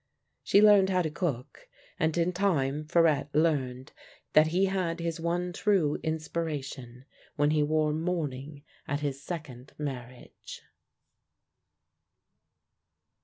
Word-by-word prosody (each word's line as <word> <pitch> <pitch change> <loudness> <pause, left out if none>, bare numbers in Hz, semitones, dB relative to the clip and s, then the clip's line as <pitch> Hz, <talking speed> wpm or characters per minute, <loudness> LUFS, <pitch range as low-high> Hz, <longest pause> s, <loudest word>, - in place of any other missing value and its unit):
She 200 - +4
learned 205 -2 +6
how 185 -1 +2
to 155 - -2
cook, 150 -7 -4 0.3
and 160 -1 +1
in 170 +1 +1
time 155 -6 0
Farette 155 -3 +2
learned 135 -5 0 0.4
that 155 0 +6
he 180 +4 +2
had 185 -3 -1
his 170 -1 -3
one 175 +2 -2
true 185 -7 +1
inspiration 150 -6 -4 0.3
when 145 -1 +2
he 155 -1 +2
wore 155 0 +1
mourning 150 -4 -3 0.2
at 145 +1 -2
his 140 -2 -3
second 140 -6 -7
marriage. 125 -4 -8
155 Hz, 115 wpm, -28 LUFS, 140-170 Hz, 0.4 s, learned